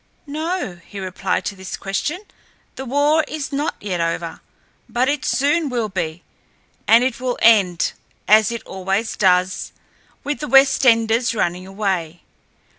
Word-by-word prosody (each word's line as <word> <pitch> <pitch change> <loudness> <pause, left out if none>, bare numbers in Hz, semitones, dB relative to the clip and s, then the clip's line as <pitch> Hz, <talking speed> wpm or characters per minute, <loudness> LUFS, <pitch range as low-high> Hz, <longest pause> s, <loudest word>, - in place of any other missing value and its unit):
"No," 310 - -3
he 200 - -9
replied 185 -1 -2
to 205 - -3
this 190 -1 -7
question. 290 - -3 0.5
"The 265 - -6
war 290 +4 +2
is 300 -2 -5
not 290 +3 -1
yet 185 -4 -3
over. 165 0 -3 0.5
But 245 +3 +1
it 290 -1 -1
soon 295 +3 +1
will 235 -4 -2
be, 175 -3 -4 0.6
and 230 +2 +6
it 255 -1 -1
will 250 -1 -2
end, 195 -7 +4 0.4
as 215 +1 +5
it 235 - -5
always 195 +4 -2
does, 185 -1 +1 0.5
with 290 0 -3
the 300 - -4
Westenders 235 -3 +4
running 180 -2 -1
away. 190 -4 -3
225 Hz, 140 wpm, -20 LUFS, 185-275 Hz, 0.6 s, and